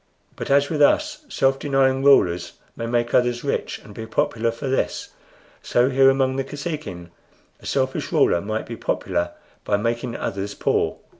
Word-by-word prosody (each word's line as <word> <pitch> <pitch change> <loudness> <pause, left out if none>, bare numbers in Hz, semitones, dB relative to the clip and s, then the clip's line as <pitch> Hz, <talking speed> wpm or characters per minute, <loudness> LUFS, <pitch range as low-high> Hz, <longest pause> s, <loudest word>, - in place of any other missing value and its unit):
But - - -6
as 140 +2 +3
with 150 -2 0
us 300 - +2
self 135 - +1
denying 135 -1 +2
rulers 90 -11 +4 0.2
may 115 - -4
make 120 0 0
others 125 -1 +2
rich 140 - -2
and 105 - -13
be 110 +2 -7
popular 115 0 0
for 115 +4 -5
this, 135 - -1 0.5
so 125 +3 +2
here 135 0 +6
among 135 0 +1
the 135 - 0
Kosekin 140 - -6 0.5
a - - -10
selfish - - -1
ruler 85 - +3
might 110 +3 -3
be - - -6
popular 85 - -2 0.3
by 100 - +1
making 115 +2 -2
others 100 +1 -4
poor. - - 0
125 Hz, 165 wpm, -22 LUFS, 110-135 Hz, 0.5 s, here